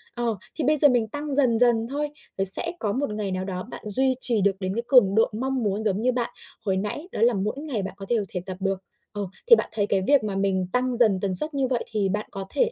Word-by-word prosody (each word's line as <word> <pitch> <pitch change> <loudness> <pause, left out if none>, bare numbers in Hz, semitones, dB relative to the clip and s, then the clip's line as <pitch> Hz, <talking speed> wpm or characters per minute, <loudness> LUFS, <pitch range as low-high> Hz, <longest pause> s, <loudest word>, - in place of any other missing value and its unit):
ờ, 235 -2 -1 0.2
thì 315 - -2
bây 305 +3 +3
giờ 290 - +7
mình 240 -3 +2
tăng 290 +3 -4
dần 245 -5 +4
dần 235 -2 +3
thôi, 295 +1 -2 0.3
rồi 195 - 0
sẽ 195 - +5
có 210 - -1
một 280 0 -1
ngày 205 -2 -3
nào 185 0 -2
đó 185 -1 -4
bạn - - -9
duy 260 +5 +2
trì 230 -4 +2
được 200 +1 +4
đến 185 0 -3
cái 235 - -2
cường 230 -7 +5
độ 225 - +4
mong 260 +2 -2
muốn, 205 +1 -1
giống 210 -1 0
như 255 - +2
bạn 245 -1 -2 0.4
hồi 190 -1 +1
nãy, 210 - -4
đó - - -4
là 240 +1 +5
mỗi 205 +2 -2
ngày 285 -8 -3
bạn 190 - -5
có 195 - -8
đều 225 -4 +1
thể 180 - -4
tập 185 -1 -6
được. 195 -1 -2 0.3
Ờ, 205 -1 -5 0.3
thì 470 - +10
bạn - - -3
thấy 205 -2 0
cái 195 -1 +1
việc 285 -5 +4
mà 200 -2 -3
mình 190 -2 0
tăng 250 -1 0
dần 215 -6 +3
tần 195 -2 -1
suất 305 - 0
như 270 -2 0
vậy 245 -2 -1
thì 205 -3 0
bạn 210 +2 -2
có 195 -1 -6
thể 485 -1 +1
220 Hz, 280 wpm, -25 LUFS, 195-255 Hz, 0.4 s, thì